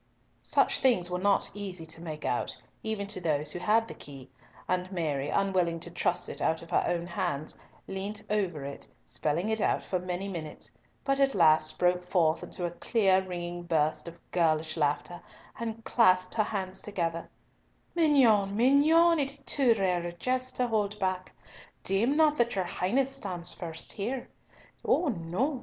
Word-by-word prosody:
Such - - +2
things 205 -9 +2
were 180 - -1
not 200 +1 +2
easy 190 -5 -6
to 160 +1 -8
make 155 -3 -6
out, 125 - -1 0.2
even 220 -2 -2
to 200 -2 -3
those 150 -2 0
who 175 - -4
had 220 +4 +2
the - - -7
key, 135 -3 -11 0.4
and 185 +1 -1
Mary, 150 -6 -1
unwilling 185 -4 +1
to 175 - -8
trust 175 +1 0
it - - -6
out 160 +1 +1
of 165 - -14
her - - +3
own 170 -1 -1
hands, 155 -4 -3 0.3
leant 200 +3 -4
over 185 -9 -1
it, 140 - -7 0.2
spelling 165 +7 -1
it 220 -1 0
out - - +1
for 185 - -2
many 180 +2 -4
minutes, 160 -6 -6 0.3
but 275 0 +2
at 275 -1 +3
last 155 -3 +4
broke 180 0 +2
forth 170 -3 +2
into 175 - -3
a 170 - -2
clear 190 0 +2
ringing 175 -1 -5
burst 160 -2 0
of 170 0 -8
girlish 160 -2 +1
laughter 150 +2 -1 0.4
and 225 -1 -5
clasped 185 -6 +3
her 215 -2 +2
hands 190 -3 -3
together, 170 -5 -3 0.6
"Mignonne, 240 - +4
mignonne, 310 +7 +5
it 275 -1 +1
is 280 - -11
too 255 -5 +4
rare 180 -4 +1
a 175 - -3
jest 255 +8 -2
to 250 - +1
hold 210 -3 0
back. 185 -2 -2 0.5
Deem 230 +10 +2
not 305 -2 +4
that 235 -2 +2
your 190 -2 0
Highness 255 +10 0
stands 180 -8 -4
first 165 -2 -5
here! 240 +5 -4 0.5
Oh 340 - +2
no! 215 - -1
185 Hz, 175 wpm, -29 LUFS, 170-225 Hz, 0.6 s, mignonne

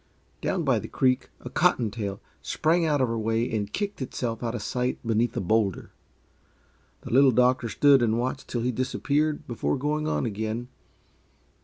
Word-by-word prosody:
Down - - -1
by - - +2
the - - -7
creek 130 -1 +1
a - - -7
"cotton 110 -3 +2
tail" 100 -3 -4 0.2
sprang 165 +1 +1
out 145 -3 +2
of 130 - +3
her 115 0 -2
way 115 +2 0
and 105 -1 -2
kicked 205 - -3
itself 120 -3 -3
out 120 -1 -2
of 110 - -4
sight 125 +2 -1
beneath 115 +1 +1
a - - +2
bowlder. 100 0 0 1.1
The - - -8
Little 135 +1 +7
Doctor 125 -1 +3
stood 140 +2 +5
and 115 -1 +2
watched 130 +2 -3
till 120 - -2
he 125 +2 0
disappeared, 145 +5 -1
before 100 -12 -1
going 150 +3 -1
on 155 - 0
again. 110 +2 -3
120 Hz, 175 wpm, -26 LUFS, 110-135 Hz, 1.1 s, Little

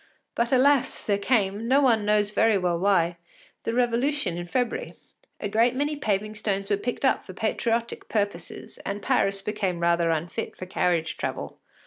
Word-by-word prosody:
But 235 +1 0
alas! 275 +1 +3
there 200 -1 +1
came, 205 -1 +1
no 270 +3 +5
one 230 -7 +3
knows 210 0 +2
very 220 0 +3
well 175 -2 0
why, 175 -3 +2 0.5
the 230 - -1
Revolution 245 - +1
in 175 0 -5
February; 245 +5 -2 0.4
a - - -2
great 230 +4 +2
many 290 +3 0
paving 215 -6 -1
stones 200 -2 -2
were 205 - +3
picked 245 +6 -3
up 265 - +2
for 185 - -10
patriotic 230 +3 -1
purposes, 200 -5 -3
and 205 +1 -4
Paris 195 -6 +1
became 195 -5 -2
rather 170 0 +2
unfit 165 +1 -3
for 185 - -6
carriage 170 -3 0
travel. - - -4
210 Hz, 165 wpm, -26 LUFS, 185-235 Hz, 0.5 s, no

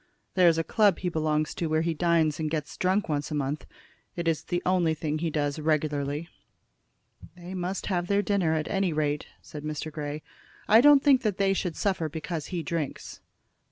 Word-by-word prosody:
There 180 -2 +5
is 165 -1 +4
a 165 - +1
club 205 0 +3
he 180 - -2
belongs 155 -2 0
to 170 - -2
where 155 +1 +1
he 165 0 0
dines 160 -2 +2
and 155 -1 -1
gets 150 -2 -3
drunk 190 +3 +1
once 145 -2 -2
a 155 - -3
month. 145 +1 -2 0.5
It's 165 -2 0
the 175 0 -3
only 175 -3 +2
thing 155 0 -2
he 165 +1 -1
does 145 -1 -1
regularly." 150 0 -1 1.1
"They 175 +1 -8
must 185 +1 -3
have 175 -3 -1
their 200 +1 +2
dinner, 185 -7 +1
at 155 0 -1
any 195 -4 0
rate," 150 -1 -1 0.2
said 150 -1 -9
Mr. 155 +1 -4
Grey. 150 0 -5 0.4
"I 220 +2 +7
don't 290 0 +7
think 275 -3 +5
they 200 -4 +1
should 180 -4 -2
suffer 185 -6 -1
because 160 0 -5
he 175 -3 -3
drinks." 155 -1 -4
165 Hz, 190 wpm, -27 LUFS, 155-185 Hz, 1.1 s, I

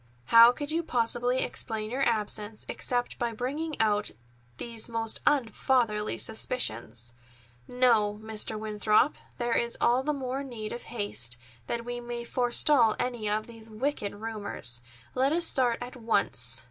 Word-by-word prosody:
How 230 +1 +10
could 290 +4 -4
you 330 +2 +1
possibly 245 -2 +1
explain 220 -2 -4
your 260 +2 -2
absence 215 -3 -1
except 245 -1 -2
by 235 -1 -1
bringing 290 +7 -3
out 210 -1 +2 0.5
these 230 - -4
most 225 -1 -1
unfatherly 235 -5 +1
suspicions? 120 - -2 0.5
No, 225 -5 +2
Mr. 220 0 -1
Winthrop, 215 +4 +2 0.2
there 240 -1 -1
is 235 0 0
all 245 +2 +3
the 300 +3 -1
more 270 -1 -3
need 230 -5 -6
of 240 - -6
haste, 205 - -1 0.3
that 235 0 -3
we 245 0 -4
may 240 0 -5
forestall 245 0 +3
any 240 -4 -2
of 215 +1 0
these 225 -1 -11
wicked 215 -2 -2
rumors. 205 - -3 0.3
Let 265 +2 +2
us 340 +1 +3
start 245 -6 +3
at 250 +1 -8
once." 230 -2 0
235 Hz, 145 wpm, -28 LUFS, 215-250 Hz, 0.5 s, How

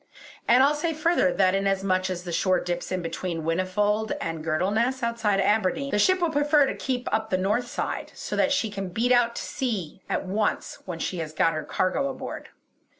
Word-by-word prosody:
And 250 +3 +6
I'll 285 +2 +4
say 315 +2 -2
further 310 - +2
that, 185 -1 +3
in 195 0 +1
as 195 -1 0
much 185 -1 +1
as 180 -1 -4
the 175 - -6
shore 185 +2 +2
dips 175 +1 -4
in 185 -1 -2
between 165 0 -4
Whinnyfold 205 +6 0
and 165 -1 -4
Girdleness 210 +11 0
outside 230 -4 +1
Aberdeen, 215 +7 +1
the 210 - +1
ship 370 - +4
will 340 -2 +2
prefer 290 -1 +4
to - - -2
keep 250 -2 -3
up 220 0 0
the 185 - +1
north 210 +6 0
side, - - -4
so - - -5
that - - +2
she 275 -7 +1
can 195 -2 -4
beat 230 +7 0
out 240 -1 +4
to - - -4
sea 210 - -3
at - - -1
once, 210 +3 -1
when 175 -3 -5
she 175 +2 -3
has 155 -1 -5
got 165 +1 +2
her 155 - -3
cargo 230 - 0
aboard." 265 - -7
205 Hz, 210 wpm, -26 LUFS, 185-245 Hz, -, And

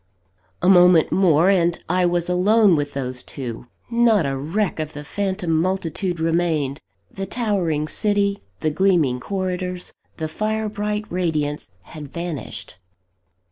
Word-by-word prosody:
A - - +3
moment 180 -3 +6
more! 180 -1 +4
and 175 -3 +2
I 180 +1 +2
was 175 -1 0
alone 195 +2 +4
with 145 -2 -2
those 130 -2 -3
two. 125 -3 -7 0.2
Not 230 -6 +3
a 135 0 -1
wreck 165 +8 -2
of 155 -1 -4
the 145 - -7
phantom 185 0 -2
multitude 175 +1 -1
remained; 160 -4 0 0.3
the 195 0 -5
towering 180 -10 -1
city, 200 +3 +1 0.2
the 155 - +1
gleaming 160 -8 +2
corridors, 180 +2 -3 0.2
the 160 - -2
fire 215 +6 -2
bright 210 0 -3
radiance 155 -5 -1
had 150 - -10
vanished. 150 - -6
175 Hz, 135 wpm, -22 LUFS, 155-195 Hz, 0.3 s, moment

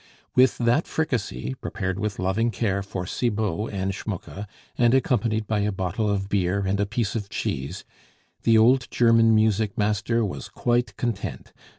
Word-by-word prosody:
With 130 -1 +4
that 120 +6 +2
fricassee, 105 - -2
prepared 95 0 -3
with 105 0 -2
loving 95 +6 +1
care 100 -4 -1
for 95 -2 -5
Cibot 105 -1 -1
and 95 -1 -2
Schmucke, 100 +1 -6 0.3
and 120 +1 +4
accompanied 115 -4 +1
by 105 0 0
a 105 +1 +1
bottle 95 +3 -1
of 100 -1 -1
beer 100 -1 +1
and 95 +1 0
a 100 - +1
piece 110 0 -1
of 105 -3 -4
cheese, 65 -6 -4 0.6
the 115 -1 +4
old 120 +3 +4
German 115 -1 +4
music 110 -1 +2
master 110 +2 +1
was 95 -1 -6
quite 120 0 0
content. 115 -5 -4
105 Hz, 160 wpm, -25 LUFS, 100-115 Hz, 0.6 s, With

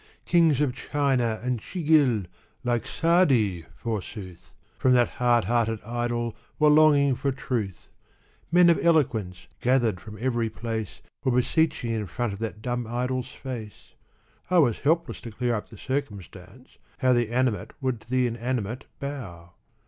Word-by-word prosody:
Kings 165 -5 +4
of 140 -4 +1
China 130 -6 0
and 125 -1 -1
Chighil, 150 - +2 0.4
like 120 -2 0
Sa'di, 130 - +2
forsooth! 105 -5 -6 0.2
From 130 - +4
that 120 -1 +4
hard 120 -2 +4
hearted 115 +1 +1
idol 120 0 -2 0.2
\*^ere 150 -1 +6
longing 145 -3 +5
for 135 +2 -1
truth 115 -8 -4 0.6
Men 175 0 +7
of 170 - 0
eloquence, 120 - +1 0.2
gathered 120 -6 +2
from 105 -1 -10
every 120 -2 0
place, 110 -2 -5 0.2
Were 130 - +2
beseeching 125 0 +1
in 110 -3 -2
front 120 +4 -2
of 100 - -8
that 110 -1 -5
dumb 120 -1 -2
itiol's 125 +2 -2
face 120 -6 -8 0.6
I 185 - +3
was 130 -10 +4
helpless 165 +3 0
to 115 - -7
clear 120 +2 -1
up 105 - -4
the 115 - -12
circumstancei 105 -3 -6 0.3
how 130 0 +3
The 120 -2 +1
Animate 125 -2 0
should 130 -5 -2
to 115 - -21
the 130 0 +2
inanimate 120 0 -3
bow? 95 -12 -7
120 Hz, 150 wpm, -26 LUFS, 110-135 Hz, 0.6 s, Men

